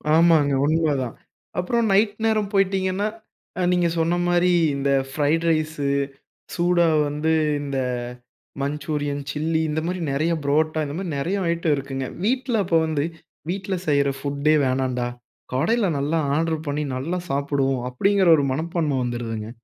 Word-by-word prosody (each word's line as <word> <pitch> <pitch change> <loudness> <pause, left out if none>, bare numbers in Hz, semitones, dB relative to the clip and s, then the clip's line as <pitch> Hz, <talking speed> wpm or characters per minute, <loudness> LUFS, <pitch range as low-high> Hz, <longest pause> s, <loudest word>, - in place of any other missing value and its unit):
ஆமாங்க. 160 -4 +5
உண்ம 155 -1 +2
தான். 120 - -6 0.4
அப்புறம் 230 +5 +1
நைட் 205 +1 +3
நேரம் 215 -2 +1
போயிட்டீங்கன்னா, 195 0 +1 0.5
அ - - +1
நீங்க 175 -1 +2
சொன்ன 170 +2 +1
மாரி 175 +1 +3 0.2
இந்த 140 0 -1 0.2
ஃப்ரைட் 155 +3 +1
ரைஸ் 155 -1 0 0.8
சூடா 175 -1 +3 0.2
வந்து 150 +2 -1 0.3
இந்த 140 -2 -3 0.8
மஞ்சூரியன் 145 0 -2
சில்லி 160 +1 0
இந்த 155 +1 -1
மாரி 180 0 -2
நெறைய 155 +5 0
புரோட்டா 155 +2 +1
இந்த 145 +1 -5
மாரி 185 -2 -4
நெறைய 185 +7 -1
ஐட்டம் 170 -3 +1
இருக்குங்க. 135 -1 -4 0.2
வீட்ல 250 +1 0
அப்போ 165 -2 +3
வந்து 150 -2 0 0.5
வீட்ல 190 +1 -2
செய்ற 140 -1 +3
ஃபுட்டே 140 +2 +1
வேணான்டா, 130 -1 0 0.5
கடையில 200 - +2
நல்லா 150 +4 0 0.2
ஆர்டர் 160 0 0
பண்ணி 145 +1 -1
நல்லா 165 +8 -2
சாப்பிடுவோம். 135 -2 0
அப்பிடிங்கிற 195 +8 +2
ஒரு 140 - +1
மனப்பான்மை 155 -1 -1
வந்துருதுங்க. 115 -3 -4
155 Hz, 140 wpm, -23 LUFS, 140-180 Hz, 0.8 s, ஆமாங்க